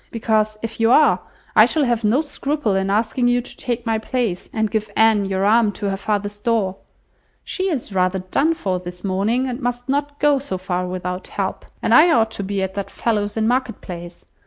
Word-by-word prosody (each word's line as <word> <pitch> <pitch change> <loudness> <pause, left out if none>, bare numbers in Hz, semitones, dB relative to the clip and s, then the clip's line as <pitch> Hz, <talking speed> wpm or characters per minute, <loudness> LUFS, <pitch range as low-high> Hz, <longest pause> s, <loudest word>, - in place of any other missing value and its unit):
Because, 215 -2 0
if 225 0 -5
you 225 0 +3
are, 300 +5 +5 0.4
I - - +8
shall 310 - +1
have 240 -2 0
no 225 +7 +3
scruple 285 -7 -1
in 190 0 0
asking 225 +4 +1
you 245 0 +3
to 245 - -7
take 240 -1 -3
my 225 -1 0
place, 220 -5 -2
and 220 -1 -1
give 215 -1 -1
Anne 220 -2 +4
your 195 0 -1
arm 220 0 +4
to 200 0 -3
her - - -1
father's 205 +1 -3
door. 205 -5 0 0.7
She 380 0 -2
is 255 - -3
rather 185 0 +1
done 275 - 0
for 185 - -2
this 180 0 -9
morning, 210 +7 0
and 250 +1 -4
must 245 0 -3
not 285 +1 -1
go 290 -1 +3
so 260 -9 -4
far 180 -1 -2
without 180 0 -4
help, - - -4 0.2
and - - +2
I 325 +3 +8
ought 225 -5 +3
to 200 - -4
be 195 0 -2
at 190 0 -3
that 200 0 -4
fellow's 210 -2 -1
in 220 - +1
the 220 - +2
Market 250 -3 0
Place. 175 -1 -9
220 Hz, 215 wpm, -21 LUFS, 195-245 Hz, 0.7 s, I